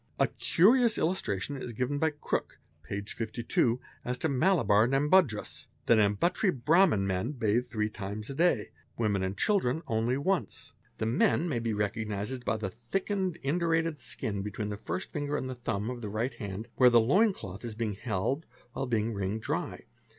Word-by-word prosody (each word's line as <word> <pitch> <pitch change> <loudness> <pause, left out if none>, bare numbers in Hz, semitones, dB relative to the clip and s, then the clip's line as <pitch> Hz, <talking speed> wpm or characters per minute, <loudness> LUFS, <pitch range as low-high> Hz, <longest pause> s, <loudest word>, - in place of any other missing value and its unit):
A - - +5
curious 235 +6 +3
illustration 145 - -1
is 125 -2 -6
given 130 +5 -1
by 160 - +3
Jrooke 150 -1 -3 0.2
(p. 100 +7 -4
52) 115 +2 -1 0.2
as 125 +1 -2
to 160 - 0
Malabar 125 - +4
Nambudris 135 - +2
:—'' - - -38
The - - +5
Nambutiri 110 - +2 0.2
Brahman 160 - +5
men 95 +8 -1
bathe 120 -1 +1
three 110 -3 -1
times 105 +1 -5
a 140 - -5
day; 155 -7 +2 0.3
women 105 -4 +1
and 95 +1 -2
children 165 -7 +1
only 115 +3 0
once. 185 +6 -1 0.2
'The - - -1
men 170 - +2
nay 120 - 0
be 115 -1 -1
recognised 105 +3 -2
by 110 - 0
the 100 -3 -4
thick 120 - -4
indurated 165 -3 0
skin 100 -4 -3
between 105 +1 -4
the 105 - -3
first 110 - -4
finger 145 -2 -2
nd 130 0 -4
thumb 110 -1 -2
of 120 -1 -6
the 105 - -4
right 110 +6 -1
hand, 100 +1 -6
where 125 -1 +7
the 120 -1 +6
loin 190 - +4
cloth 100 - -9
is 115 -3 -5
being 110 -2 -2
held 115 - -2 0.3
while 135 - -3
ping 115 -1 0
wringed 100 +2 -2
dry. - - -3
120 Hz, 175 wpm, -30 LUFS, 105-150 Hz, 0.3 s, where